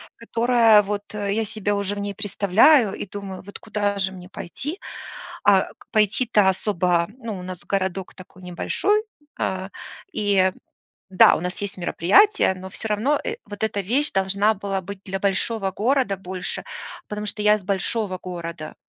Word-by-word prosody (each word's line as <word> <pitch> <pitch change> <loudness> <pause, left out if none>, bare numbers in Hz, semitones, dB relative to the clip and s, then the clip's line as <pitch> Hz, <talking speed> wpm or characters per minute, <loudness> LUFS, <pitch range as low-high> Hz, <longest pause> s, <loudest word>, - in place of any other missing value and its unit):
которая 230 -2 +4
вот 205 0 -2
я 205 +1 -1
себя 210 -1 -2
уже 200 0 -1
в 205 - -5
ней 200 0 -3
представляю 205 - +4
и - - -6
думаю, 195 -1 -7
вот 200 +1 -10
куда 205 -2 -2
же 190 -1 0
мне 180 -1 -11
пойти? 295 - -6 0.7
А 195 -2 +5
к - - -20
пойти-то 215 -1 +3
особо, 180 -3 +1
ну, 225 -5 -5
у - - -8
нас 180 -1 -7
городок 190 -1 -2
такой 185 0 -14
небольшой, 375 - +1 0.4
а, 190 0 -2 0.4
и, 195 -3 +2 0.6
да, 185 - +6
у - - -2
нас 180 +4 -4
есть 200 -1 -4
мероприятия, 190 - +4
но 190 0 -9
всё 220 - -5
равно, 230 +8 +2
э, - - -3
вот 205 +1 -7
эта 220 -2 0
вещь 250 +10 +1
должна 200 +2 +2
была 195 -1 -3
быть 195 +1 -8
для 195 0 -3
большого 195 +1 0
города 240 0 +1
больше, 185 0 -5 0.4
потому 210 0 -4
что 210 - -4
я 210 0 +5
с 205 - -13
большого 195 +1 -1
города. 170 -3 -6
200 Hz, 165 wpm, -23 LUFS, 190-215 Hz, 0.7 s, да